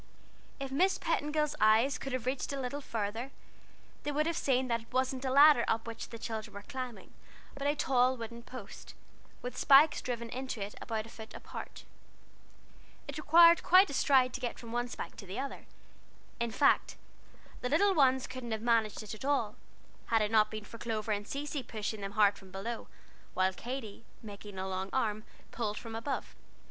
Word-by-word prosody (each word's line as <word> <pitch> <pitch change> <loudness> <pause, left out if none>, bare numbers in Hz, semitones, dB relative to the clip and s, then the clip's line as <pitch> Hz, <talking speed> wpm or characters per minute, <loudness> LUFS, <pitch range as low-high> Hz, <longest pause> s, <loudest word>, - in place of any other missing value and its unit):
If 275 -1 -5
Miss 365 +8 +3
Petingill's 300 0 0
eyes 220 +6 +4
could 270 - -5
have 255 -2 -2
reached 255 +2 -2
a 280 - -3
little 270 +3 -3
farther, 225 +1 -3 0.7
they 295 - -2
would 300 +1 +1
have 335 0 0
seen 260 -3 +1
that 235 -1 0
it 225 - -20
wasn't 260 +1 0
a - - +1
ladder 280 -1 +7
up 225 0 0
which 230 -1 -7
the 230 - -7
children 220 -2 -5
were 200 - -7
climbing, 255 -5 -7 0.4
but 280 0 -3
a 290 - +2
tall 255 -2 +2
wooden 235 0 -7
post, 255 +2 -10 0.5
with 250 0 -5
spikes 290 +2 +6
driven 235 -2 -3
into 260 -2 -4
it 200 +1 -4
about 220 -2 -3
a - - -12
foot 220 -1 -11
apart. - - -9 1.2
It - - -5
required 335 +2 +7
quite 370 0 +6
a - - -5
stride 260 -2 +4
to 255 - -5
get 245 - -3
from 230 -1 -9
one 240 +1 -1
spike - - -7
to 200 - -10
the 185 - -6
other; 275 +1 -5 0.7
in 235 0 0
fact 280 +5 +3 0.7
the 250 - -1
littler 390 +8 +4
ones 265 -5 +4
couldn't 255 -3 -5
have 220 - -3
managed 225 -3 +2
it 215 - -7
at 215 - -9
all, 265 -7 0 0.5
had 225 -2 +3
it 210 - -1
not 215 -1 +4
been 215 -1 -6
for 230 - -11
Clover 220 -2 -2
and 205 0 -2
Cecy 285 0 -3
"boosting" 220 -2 -4
very 195 0 -5
hard 205 -1 +4
from 190 - -15
below, 220 +5 -5 0.5
while 185 0 +2
Katy, 230 -1 -6 0.2
making 205 -2 -9
a 190 0 -3
long 190 0 -3
arm, 215 -4 0 0.3
clawed 215 -3 -2
from 230 -1 -7
above. 230 +5 -4
240 Hz, 190 wpm, -32 LUFS, 215-275 Hz, 1.2 s, ladder